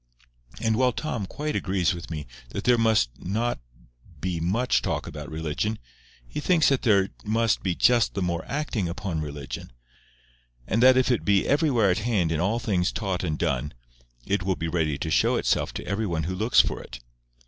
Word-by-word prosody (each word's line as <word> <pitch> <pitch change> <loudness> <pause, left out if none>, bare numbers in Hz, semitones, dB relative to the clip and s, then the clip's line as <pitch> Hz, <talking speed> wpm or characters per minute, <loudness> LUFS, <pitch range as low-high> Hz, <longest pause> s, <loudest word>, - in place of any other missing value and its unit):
And 110 -1 +1
while 125 -1 +3
Tom 115 -10 -3
quite 150 +6 -4
agrees 95 -1 +1
with 85 0 -8
me 75 -3 -5 0.2
that - - -5
there 125 - +5
must 110 - +3
not 115 +6 -1 0.6
be 90 0 -2
much 105 +10 +1
talk - - -2
about - - -7
religion, 80 +8 -2 0.5
he - - -5
thinks 160 0 +3
that 135 -2 +1
there 100 -5 +3
must 110 +1 +1
be 90 -3 -1
just 120 +3 +3
the 100 - -1
more 85 -2 -1
acting 135 - -2
upon 90 -3 -3
religion; 75 -4 -6 0.9
and 110 - 0
that 130 +1 +7
if 130 0 +3
it 120 - +1
be 100 -2 +2
everywhere 135 - +3
at 90 - 0
hand 105 -7 0
in 80 - 0
all 100 +6 +1
things 95 -7 0
taught 95 -5 -2
and 80 -4 -1
done, 75 -2 -1 0.5
it 100 -1 0
will 95 0 0
be 85 - -3
ready 80 -3 0
to - - -3
show - - +3
itself - - +1
to - - -5
every 105 +3 -1
one 80 -3 -1
who 90 +4 -2
looks 110 +6 +4
for - - -4
it. - - -10
100 Hz, 190 wpm, -26 LUFS, 85-115 Hz, 0.9 s, that